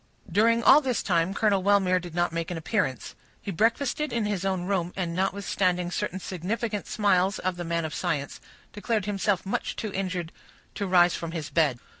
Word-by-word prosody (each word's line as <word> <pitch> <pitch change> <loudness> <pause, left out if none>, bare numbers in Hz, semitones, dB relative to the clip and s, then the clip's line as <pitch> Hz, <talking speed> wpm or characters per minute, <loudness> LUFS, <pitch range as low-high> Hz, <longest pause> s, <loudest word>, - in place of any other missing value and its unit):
During 230 +5 +3
all 295 - +8
this 255 -4 -1
time 170 -1 +1
Colonel 205 -3 +2
Wellmere 190 -2 +3
did 175 -2 -9
not 175 -1 +1
make 165 0 -2
his 175 - -4
appearance; 165 - -2 0.3
he 200 - -5
breakfasted 240 - 0
in 230 -2 0
his 205 -3 -2
own 190 -2 -1
room, 180 -2 -1
and, 175 -3 -2
notwithstanding 185 -1 0
certain 185 +1 -2
significant 205 +4 -3
smiles 200 -2 +2
of 185 0 -2
the 175 - -5
man 170 -1 -1
of 155 - -5
science, 145 -1 -3 0.3
declared 210 -1 -1
himself 205 -1 0
too 190 - -8
much - - -2
injured 185 -4 -3 0.4
to 200 - -3
rise 175 -1 +5
from 165 -1 -5
his 160 -4 -5
bed. 150 -7 +2
185 Hz, 185 wpm, -26 LUFS, 175-205 Hz, 0.4 s, all